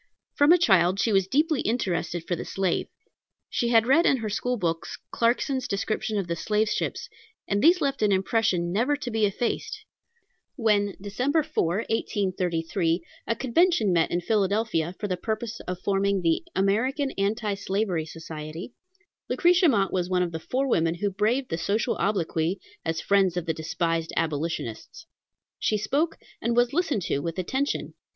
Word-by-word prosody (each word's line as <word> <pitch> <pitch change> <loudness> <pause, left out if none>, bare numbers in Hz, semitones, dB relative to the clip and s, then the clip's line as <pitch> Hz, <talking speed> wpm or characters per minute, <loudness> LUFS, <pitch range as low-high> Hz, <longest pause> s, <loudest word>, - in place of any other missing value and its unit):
From 290 +2 +5
a 355 - +8
child 190 - +3
she 225 - +2
was 195 -1 +3
deeply 300 - +2
interested 175 -6 -1
for 175 - 0
the - - -5
slave. 190 -3 -1 0.6
She 240 - 0
had 230 -1 +4
read 310 +8 +4
in 270 - +4
her 220 -3 -4
school 245 +4 -1
books 165 -4 -2
Clarkson's 250 +2 +1
description 215 +2 -2
of 195 - -1
the 170 0 -2
slave 210 +5 0
ships, - - -2 0.4
and 200 0 0
these 345 +3 +5
left 275 -1 0
an 210 -1 +3
impression 190 -3 +1
never 245 +8 +2
to 260 -4 -5
be 220 -2 +2
effaced. 230 +4 -3 0.7
When, 210 -5 +2
Dec. 255 - -1
4, 310 - 0 0.2
1833, 180 -5 -1 0.2
a 230 - +1
convention 265 - +2
met 165 -2 +2
in 175 - -1
Philadelphia 200 -3 0
for 205 - -2
the 185 -2 -2
purpose 220 +3 -4
of 180 0 -3
forming 200 -1 +1
the 165 -1 +1
American 255 +9 +1
Anti 210 +2 -1
Slavery 195 -4 -1
Society, 160 +4 -8 0.6
Lucretia 350 -1 +4
Mott 200 -7 +1
was 180 -1 0
one 180 -1 +2
of 175 - -3
the 160 - -4
four 260 +10 -1
women 165 -8 +2
who 200 +3 -1
braved 225 +7 0
the 165 - -1
social 205 +6 0
obloquy, 180 -3 0 0.2
as 165 0 -1
friends 195 -3 +2
of 175 - -2
the 165 - 0
despised 165 +1 -2
abolitionists. 160 - -3 0.5
She 215 - +1
spoke, 285 +10 0 0.2
and 235 +1 0
was 245 +1 +3
listened 315 - 0
to 140 - -1
with 165 +4 -4
attention. 265 +10 -2
200 Hz, 165 wpm, -26 LUFS, 175-240 Hz, 0.7 s, a